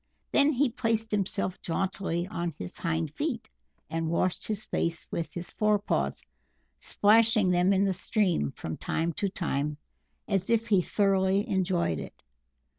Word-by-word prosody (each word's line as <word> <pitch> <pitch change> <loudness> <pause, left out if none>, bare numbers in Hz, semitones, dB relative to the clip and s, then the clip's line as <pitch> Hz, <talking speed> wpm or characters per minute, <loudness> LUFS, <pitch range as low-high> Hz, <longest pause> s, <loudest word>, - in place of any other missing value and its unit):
Then 285 +1 +5
he 265 -1 +2
placed 225 -2 0
himself 195 -2 -1
jauntily 180 -1 -1
on 170 -4 -4
his 90 -1 -5
hind 160 -2 -1
feet, 265 - -3 0.4
and 165 0 -2
washed 170 +2 0
his 215 -1 -2
face 165 -1 -1
with 165 - -3
his 175 0 -5
forepaws, 205 - 0 0.5
splashing 215 -2 +4
them 180 +2 +3
in 195 0 +3
the 195 - +1
stream 185 - 0
from 80 - -6
time 165 +1 -1
to 200 +5 -1
time 150 -5 -2 0.5
as 195 -2 0
if 230 0 +2
he 195 -4 +5
thoroughly 195 +2 +2
enjoyed 180 - 0
it. - - -10
190 Hz, 145 wpm, -28 LUFS, 170-210 Hz, 0.5 s, Then